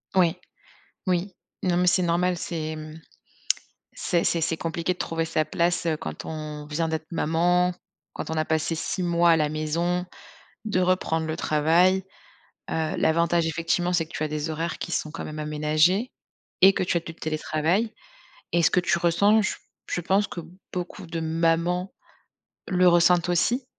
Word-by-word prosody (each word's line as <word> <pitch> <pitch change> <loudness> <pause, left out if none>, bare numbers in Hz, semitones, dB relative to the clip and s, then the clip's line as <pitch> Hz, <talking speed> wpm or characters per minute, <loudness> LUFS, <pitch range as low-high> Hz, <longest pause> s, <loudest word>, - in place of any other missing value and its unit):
Oui, 175 -3 +4 0.7
oui. 180 +1 0 0.3
Non, 180 -2 +1
mais 180 - +2
c'est 180 +1 +4
normal, 175 +1 +1
c'est 155 -2 -4
mmh, 155 +1 -9 0.9
c'est 170 -1 0
c'est 170 - +1
c'est 165 0 0
compliqué 165 +2 -2
de 180 - -11
trouver 165 0 -1
sa 160 -1 0
place, 170 +2 0
heu, 160 -2 +1
quand - - -7
on 150 -1 -6
vient 160 +2 -1
d'être 160 0 -3
maman, 175 +3 +2 0.4
quand - - -6
on - - -1
a 155 - +1
passé 160 +1 0
6 180 +3 -3
mois 170 0 +3
à 165 - +6
la 150 -1 +1
maison, 170 +4 -1 0.6
de 205 -4 0
reprendre 180 -3 +1
le 155 - -2
travail. 170 +5 +3 0.7
Heu, 160 -1 -1
l'avantage 170 +1 +2
effectivement, 165 +2 0
c'est 165 -3 +1
que - - -17
tu - - -3
as 155 - 0
des 150 +1 -3
horaires 165 +2 -3
qui 175 - -5
sont 155 - -1
quand 165 - -6
même 155 0 -7
aménagés 155 +9 +2 0.5
et 195 - +9
que 190 - -1
tu 180 -1 0
as - - +2
du 165 0 -9
télétravail 160 +8 -1 0.6
et 170 - +3
ce - - +4
que 180 - +3
tu 175 -1 +1
ressens, 200 +6 +4
je 210 - -1
p - - -15 0.3
je 175 - -1
pense 195 +4 +2
que 170 - -6 0.3
beaucoup 180 +1 -5
de 165 0 -4
mamans, 165 +3 0 0.8
le 180 -1 +3
ressentent 175 0 +4
aussi. 240 +9 +1
170 Hz, 180 wpm, -25 LUFS, 160-180 Hz, 0.9 s, et